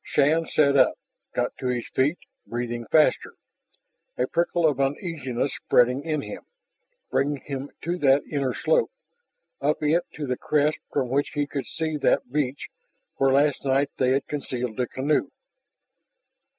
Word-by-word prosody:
Shann 155 +3 +2
sat 140 -2 +3
up, 130 -2 +4 0.3
got - - -1
to 130 - -2
his 125 -1 -1
feet, 145 +6 +1 0.3
breathing 120 -1 -4
faster, 155 -1 +3 0.8
a - - +2
prickle 170 0 0
of 145 -4 +2
uneasiness 135 - -1
spreading 125 +2 +2
in 155 -2 -1
him, - - -7 0.7
bringing 145 0 0
him 140 0 -5
to 175 +2 -2
that 140 -1 +4
inner 135 -3 -2
slope, - - +2 0.7
up 150 +2 0
it 160 +4 +3
to 150 - -4
the 125 -2 -2
crest 150 0 +1
from 125 - 0
which 140 +3 0
he 145 0 +1
could 140 -1 -5
see 160 -1 -2
that 125 -3 +1
beach 140 -1 -1 0.5
where 135 0 +3
last 140 +1 +2
night 140 +1 +1
they 130 - +2
had 135 +1 +1
concealed 125 -5 -4
the 125 -1 0
canoe. 140 +5 0
140 Hz, 150 wpm, -25 LUFS, 130-150 Hz, 0.8 s, up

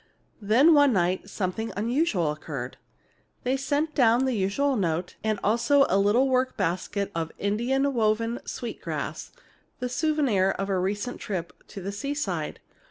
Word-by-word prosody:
Then, 245 +11 +5
one 285 -3 +5
night, 185 +1 0
something 205 +3 -3
unusual 220 - +1
occurred. 140 -4 -6 0.7
They 250 - 0
had 270 - 0
sent 290 +3 -1
down 245 -2 +4
the 260 - 0
usual 230 +8 +1
note, 175 -4 -1
and 215 -1 0
also 255 +7 +4
a 195 - +3
little 215 +7 +3
work 255 0 +1
basket 200 +4 -1
of 165 -1 -3
Indian 255 +7 0
woven 230 +1 +1
sweet 240 - -6
grass, - - -5 0.5
the 250 0 -3
souvenir 250 - +1
of 195 0 -3
a 190 -2 +1
recent 205 +6 -2
trip 180 -5 -4
to 195 - -8
the 200 - -3
seaside. 200 - -3
220 Hz, 155 wpm, -26 LUFS, 190-265 Hz, 0.7 s, Then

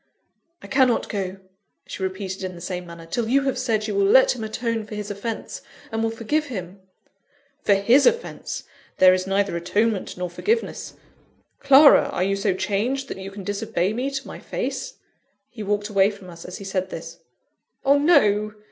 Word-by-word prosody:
"I - - -9
cannot 260 -3 +2
go," 195 -2 -3 0.5
she - - -8
repeated 190 0 -4
in 185 -1 -4
the - - -10
same 180 0 -5
manner, 170 -1 -10
"till 225 +7 -2
you 275 +2 +3
have 270 -2 -1
said 225 -4 0
you 210 - -2
will 200 0 +2
let 260 +5 +6
him 230 - -6
atone 225 +1 -2
for 215 0 -8
his 210 0 -5
offence, 220 +3 -5 0.3
and 225 0 -1
will 225 - +1
forgive 230 +7 -1
him." 190 -6 -7 0.8
"For 200 - +4
his 235 +8 +5
offence 475 0 -2 0.3
there 185 0 +7
is 185 0 -1
neither 195 -1 +1
atonement 205 +5 -1
nor 180 0 -2
forgiveness. 445 - -2 0.6
Clara! 280 +1 +7
are 180 - -1
you 195 +1 +1
so 195 -1 0
changed, 220 +9 -1
that - - -6
you 190 0 -6
can 195 0 -9
disobey 200 -1 -1
me 250 +4 -1
to 275 -1 -5
my - - -8
face?" - - -4 0.6
He 230 - -9
walked 205 0 -1
away 195 -2 +3
from 200 -3 -11
us 170 0 -11
as 180 - -7
he - - -9
said 190 -1 -2
this. - - -8 0.7
"Oh, 280 +1 +5
no! 215 -10 +3
205 Hz, 185 wpm, -23 LUFS, 190-245 Hz, 0.8 s, there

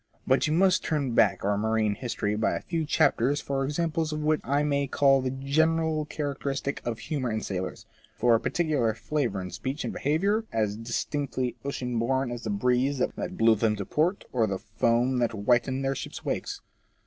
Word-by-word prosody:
But 130 +4 +3
you 150 - +1
must 185 +2 +3
turn 140 -6 -1
back 100 -5 +3
our 100 0 +1
marine 110 -1 +1
history 105 -2 -2
by 110 - +1
a - - -3
few 165 -2 -2
chapters 140 0 +2
for 135 -1 -2
examples 160 +2 -1
of 155 0 -3
what 155 0 +2
I 140 +2 +1
may 140 -1 +1
call 135 0 +4
the 130 - -1
general 155 +4 +1
characteristic 140 -2 -3
of 115 -2 -3
humour 135 -3 -3
in 110 0 -1
sailors 95 -2 -4 0.2
— - - -31
for 120 0 +4
a 115 - +4
particular 145 -11 0
flavour 120 -5 -1
in 90 -1 -6
speech 130 - -4
and - - -3
behaviour, 195 +10 +1
as 105 -2 0
distinctly 125 +2 -2
ocean 125 -4 -2
bom 130 +2 0
as 120 -1 -5
the 110 - -4
breeze 125 +6 +1
that 125 - -2
blew 115 0 +5
them 110 0 +1
to 100 -2 -5
port, 170 - 0
or 115 -3 +2
the 95 -1 -2
foam 115 +4 +1
that 120 -1 +1
whitened 120 +5 +1
their 135 - +1
ships' - - -7
wakes. - - -3
130 Hz, 195 wpm, -27 LUFS, 115-145 Hz, 0.2 s, blew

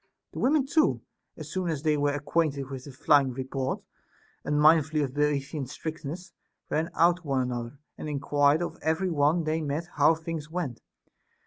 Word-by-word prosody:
The - - -6
women 275 +1 +3
too, 310 +3 +2 0.4
as - - -8
soon 185 -3 -1
as 155 -3 -3
they 155 -2 +3
were 145 0 +1
acquainted 145 -2 -1
with 130 -1 -6
the 140 - -9
flying 135 0 +3
report, 130 +1 -3 0.6
unmindful 155 +1 +4
of 130 -2 -3
the 145 - -1
Boeotian 140 -1 -3
strictness, 160 +4 -6 0.4
ran 160 +2 0
out 170 +1 +4
to - - -17
one 135 -2 +1
another, 120 +1 -4 0.2
and 155 - -5
enquired 145 +2 +2
of - - -5
every 160 +4 0
one 155 +2 +2
they 155 +1 -1
met 150 +2 -2
how 150 +3 +5
things 160 -1 -6
went. 160 -8 -4
150 Hz, 175 wpm, -27 LUFS, 140-165 Hz, 0.6 s, how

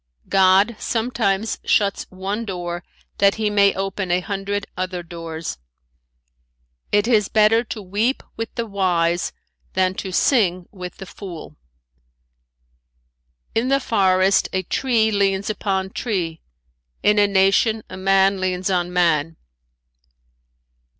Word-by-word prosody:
"God 195 +4 +4
sometimes 225 -3 -1
shuts 200 -2 +1
one 195 +4 -4
door 175 -4 -5 0.4
that 200 0 +4
he 215 -1 -1
may 200 -1 +4
open 195 -1 -3
a 175 +1 +2
hundred 200 +1 -3
other 185 -1 -3
doors. 165 - -6 1.3
"It 205 +1 +3
is 215 -5 +3
better 220 +2 +4
to 215 -2 -6
weep 210 +8 -1
with 225 -1 -4
the 235 - -2
wise 175 -4 0 0.4
than 185 0 +2
to 190 - -6
sing 185 -5 +2
with 180 -3 -8
the 195 - -8
fool. 175 -5 -9 2.0
"In 230 +3 +1
the 275 +1 +3
forest 190 -5 +2
a 185 0 0
tree 225 +2 +1
leans 200 0 +1
upon 190 -2 -2
tree, 175 -10 -3 0.6
in 210 0 +4
a 205 - +5
nation 200 +3 +3
a - - -9
man 195 0 +2
leans 185 0 -1
on 180 -1 0
man. 165 -3 +1
195 Hz, 125 wpm, -21 LUFS, 180-210 Hz, 2.0 s, a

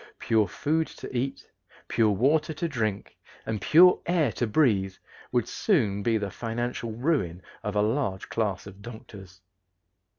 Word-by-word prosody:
Pure 110 -3 +2
food 155 - 0
to - - -9
eat, 130 +3 -3 0.4
pure 110 -2 +2
water 150 +10 +2
to 170 +3 -2
drink, 110 -9 -3 0.3
and 110 -2 -3
pure 180 +3 +6
air 165 -8 +2
to 120 - -2
breathe 105 -7 +2 0.4
would 120 -2 +1
soon 110 - +1
be 115 +2 +2
the 100 -2 -3
financial 120 +1 -3
ruin 115 - -1 0.2
of 105 0 -4
a 105 - +3
large 110 -4 -1
class 100 -5 -2
of 100 0 -12
doctors. 100 -4 -11
115 Hz, 145 wpm, -27 LUFS, 100-140 Hz, 0.4 s, pure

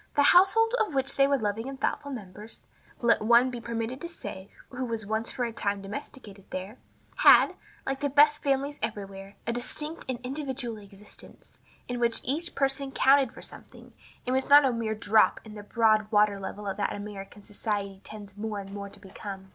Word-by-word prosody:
The 285 - +4
household 390 +9 +5
of 425 -10 0
which 270 0 0
they 275 0 +5
were 280 0 +2
loving 220 +2 -2
and 270 -1 -8
thoughtful 285 +1 -2
members 210 -2 -9 0.4
(let 235 -1 +3
one 235 +3 +5
be 240 -1 -6
permitted 230 +2 -4
to 340 - -5
say 195 - -8 0.2
who 260 0 -5
was 230 -3 -3 0.3
for 250 - -2
a 230 - -5
time 200 -2 -2
domesticated 205 -3 -9
there) 190 +6 -6 0.4
had, - - +7 0.3
like 270 0 -2
the 285 - 0
best 295 +2 +5
families 280 +1 0
everywhere, 200 -2 -5
a 235 - -1
distinct 300 +6 -4
and 250 -2 -2
individual 260 -4 -4
existence, 200 0 -13 0.3
in 245 0 -3
which 235 -1 +1
each 315 +7 -1
person 275 0 0
counted 270 +1 +4
for - - -12
something, - - -12 0.3
and 250 - -1
was 265 +1 0
not 290 0 +8
a 260 - +2
mere 225 -2 -2
drop 215 0 +3
in 215 - -10
the 210 - -8
broad 215 0 +2
water 210 -1 +3
level 205 +2 -6
that 205 - -2
American 205 0 -8
society 200 -2 -4
tends 205 -2 -10
more 210 0 -4
and 195 0 -9
more 200 0 -6
to - - -15
become. 195 0 -9
230 Hz, 185 wpm, -28 LUFS, 205-270 Hz, 0.4 s, not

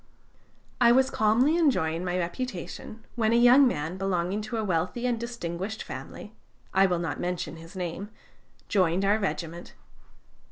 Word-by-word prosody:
"I 235 -1 +7
was 265 +2 +4
calmly 240 +9 +3
enjoying 170 - +1
my 180 0 -1
reputation, 200 +3 -5
when 225 -1 +1
a - - +4
young 245 +3 +7
man 160 -4 -2
belonging 190 +1 -1
to 230 - -3
a 220 - -1
wealthy 185 +6 -1
and 240 -2 0
distinguished 215 -3 -5
family 135 +10 -9 0.4
I 195 0 +5
will 180 -2 0
not 165 -4 -3
mention 175 -3 -3
his 165 +4 -13
name 180 +2 -4 0.6
joined 185 -1 +2
our 205 +2 +3
regiment. 170 -4 -4
195 Hz, 150 wpm, -27 LUFS, 170-235 Hz, 0.6 s, I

